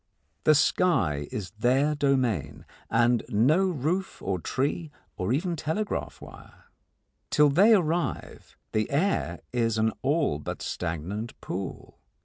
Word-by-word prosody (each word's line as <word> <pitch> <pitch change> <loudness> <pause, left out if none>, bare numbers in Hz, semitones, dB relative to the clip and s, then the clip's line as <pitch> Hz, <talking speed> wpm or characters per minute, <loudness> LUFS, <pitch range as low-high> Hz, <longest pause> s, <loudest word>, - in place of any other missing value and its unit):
The 155 - +6
sky 110 - +2
is 95 -5 -5
their 135 +6 +3
domain, 125 - 0 0.2
and 120 0 +3
no 150 - +3
roof 175 +4 -2
or 95 -1 -2
tree 145 - -2 0.3
or 90 +4 -2
even 170 +6 0
telegraph 160 +7 -3
wire. - - -14 0.6
Till 150 -1 +5
they 200 +10 +6
arrive 170 -2 -2
the 110 0 0
air 180 +8 0
is 115 -2 +1
an 110 0 +2
all 145 - +1
but - - -6
stagnant 90 +7 -4
pool. 95 +1 -6
135 Hz, 125 wpm, -27 LUFS, 105-160 Hz, 0.6 s, The